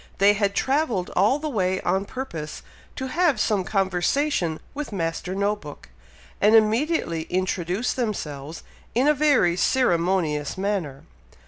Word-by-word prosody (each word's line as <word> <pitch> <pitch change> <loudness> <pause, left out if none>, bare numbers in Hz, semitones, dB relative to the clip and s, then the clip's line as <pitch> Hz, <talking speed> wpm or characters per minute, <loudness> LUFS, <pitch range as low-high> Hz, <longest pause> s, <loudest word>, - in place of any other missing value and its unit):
They 200 +1 +5
had 200 -1 0
travelled 260 - 0
all 205 +9 +4
the 310 +1 -4
way 190 -8 0
on 190 +1 0
purpose 170 - -6 0.3
to 260 - -4
have 320 -5 +2
some 210 -3 +1
conversation 190 - 0
with 290 -2 -5
Master 180 0 -3
No 200 +1 +1
book, 150 -8 -12 0.5
and 210 +2 +5
immediately 220 - +2
introduced 185 +3 -1
themselves 160 - -4 0.3
in 255 +4 +3
a 300 - +6
very 285 - +3
ceremonious 175 - +1
manner. 190 -9 -2
200 Hz, 130 wpm, -24 LUFS, 175-250 Hz, 0.5 s, a